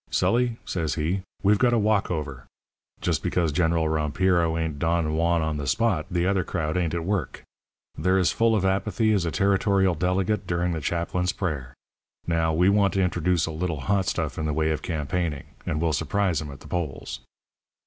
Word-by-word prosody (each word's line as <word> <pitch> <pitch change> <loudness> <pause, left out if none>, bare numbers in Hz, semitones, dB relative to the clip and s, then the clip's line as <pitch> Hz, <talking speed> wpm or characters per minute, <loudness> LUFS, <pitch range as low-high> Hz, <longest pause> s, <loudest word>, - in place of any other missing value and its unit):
"'Sully,' 120 -1 +1
says 80 -6 -2
he, 85 +5 -1 0.2
'we've 100 +1 +4
got 125 -1 +3
a - - +4
walkover. 80 - -1 0.5
Just - - 0
because 85 -4 0
General 80 0 +1
Rompiro 80 +2 +1
ain't 80 -3 -3
Don 80 -1 +1
Juan 85 +1 +2
on 80 -1 -1
the 70 -2 -4
spot 105 - +1
the 90 0 0
other 95 -1 +2
crowd 80 -3 -2
ain't 85 -2 0
at 85 - -2
work. 95 -6 -2 0.5
They're 95 +5 +2
as 90 -2 +3
full 115 -1 +2
of 95 -3 +1
apathy 105 +3 +1
as 95 -4 +1
a - - -1
territorial 100 -1 +2
delegate 90 +4 0
during 85 0 0
the 80 -2 -3
chaplain's 85 +3 -1
prayer. 70 -9 -4 0.5
Now, 80 -1 +1
we 85 +4 +3
want 100 0 +3
to 95 - +3
introduce 90 -1 +1
a 80 - -4
little 80 -2 -3
hot 95 +5 +1
stuff - - -2
in 80 - -1
the 75 - -1
way 80 +1 +1
of 75 - -2
campaigning, 80 -2 -2 0.2
and 75 - -1
we'll 80 -1 +1
surprise 80 +1 0
'em 75 - -6
at 70 -2 -10
the - - -12
polls.' 70 -7 -4
85 Hz, 190 wpm, -25 LUFS, 80-95 Hz, 0.5 s, we've